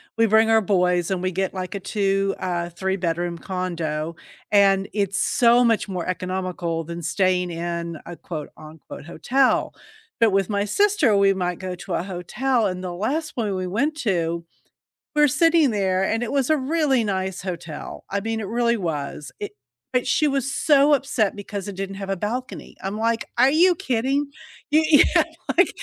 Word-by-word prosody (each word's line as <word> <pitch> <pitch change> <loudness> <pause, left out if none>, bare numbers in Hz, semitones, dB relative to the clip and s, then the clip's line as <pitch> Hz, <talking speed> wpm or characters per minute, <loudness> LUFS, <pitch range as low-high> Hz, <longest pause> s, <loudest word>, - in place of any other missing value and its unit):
We 225 0 +3
bring 220 +1 +4
our 220 0 +5
boys 180 -3 +1
and 185 -1 -2
we 185 - 0
get, 190 +1 -2
like, 185 +2 -4
a 200 - -3
two, 195 -1 0
uh, 175 -2 -2
three-bedroom 175 -2 -2
condo, 170 -4 -3 0.4
and 195 -1 +4
it's 200 -2 0
so 240 0 +4
much 225 -3 +1
more 180 -3 -3
economical 180 -2 -3
than 170 +2 -7
staying 180 +1 +1
in 170 -1 -4
a 175 - -8
quote, 155 -4 -7
unquote 155 -1 -11
“hotel.” 255 +9 +1 0.5
But 225 -3 +4
with 195 0 +1
my 200 0 0
sister, 315 - +3
we 195 0 +4
might 180 -2 -2
go 185 -1 -4
to 180 0 -7
a - - -1
hotel, 210 +6 -1
and 185 0 -4
the 180 -1 -4
last 280 - -2
one 210 -5 -1
we 185 0 -2
went 280 +11 0
to, 170 -5 -1 0.7
we're 295 -1 +5
sitting 330 -1 +4
there 190 -2 +1
and 225 +4 0
it 240 - -3
was 275 -1 +1
a 310 - +5
really 275 -3 +1
nice 190 -2 -2
hotel, 170 -4 -6
I 200 +1 -1
mean, 225 +1 -3
it 205 - -4
really 235 +1 +1
was, 150 -5 -4
it 205 - -5 0.4
but 250 -1 +1
she 305 - +2
was 275 -1 0
so 290 0 +4
upset 255 -7 0
because 200 -1 -6
it 195 - -6
didn't 195 0 -5
have 195 -1 -6
a 195 - -1
balcony. 240 +7 -5
I'm 195 +2 -3
like, 230 0 0
"Are 255 +3 +5
you 350 +4 +5
kidding?" 270 +2 -1 0.4
Y 310 +1 +5
yeah, 290 - +6 0.3
like, - - +6
195 Hz, 180 wpm, -23 LUFS, 180-235 Hz, 0.7 s, yeah